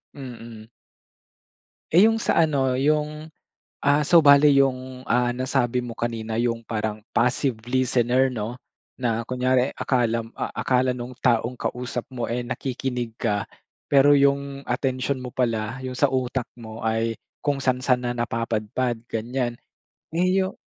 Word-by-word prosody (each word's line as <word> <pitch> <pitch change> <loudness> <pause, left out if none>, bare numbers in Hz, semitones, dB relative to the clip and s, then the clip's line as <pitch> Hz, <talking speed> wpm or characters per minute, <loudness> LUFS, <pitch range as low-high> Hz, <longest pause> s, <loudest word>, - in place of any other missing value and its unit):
mm. 115 -5 -10 1.2
Eh, 185 +7 +7
yung 225 - +2
sa - - +2
ano, 135 -5 +2
yung, 150 +2 0 0.6
ah, 145 +1 +3
so 170 -1 +6
bale 140 0 +7
yung, 130 -2 +1
ah, 125 -1 +1
nasabi 125 -1 0
mo 120 - -6
kanina 115 -1 -2
yung 115 -1 -1
parang 110 -1 -3
passive 125 0 +1
listener, 130 0 +2
'no, 115 0 -4 0.4
na 115 -2 -1
kunyari 130 +1 +1
akalam 115 -3 0
ah, - - -3
akala 125 0 +1
nung 125 0 -6
taong 120 0 +1
kausap 125 -1 -3
mo 120 -2 -3
eh 120 +1 -2
nakikinig 125 -2 -3
ka, 105 -3 0 0.5
pero 145 +1 +6
yung 140 0 +1
atensiyon 130 +1 -1
mo 125 -1 -7
pala, 115 -1 -1
yung 130 0 -5
sa 145 - +4
utak 130 -1 -1
mo 110 -2 -9
ay 115 0 0 0.3
kung 145 -2 0
saan-saan 125 -1 +1
na 120 - -1
napapadpad, 115 +1 -2
ganyan. 120 +2 -2 0.6
Eh, 175 +2 +2 0.2
yu 190 - -3
125 Hz, 140 wpm, -24 LUFS, 115-135 Hz, 1.2 s, Eh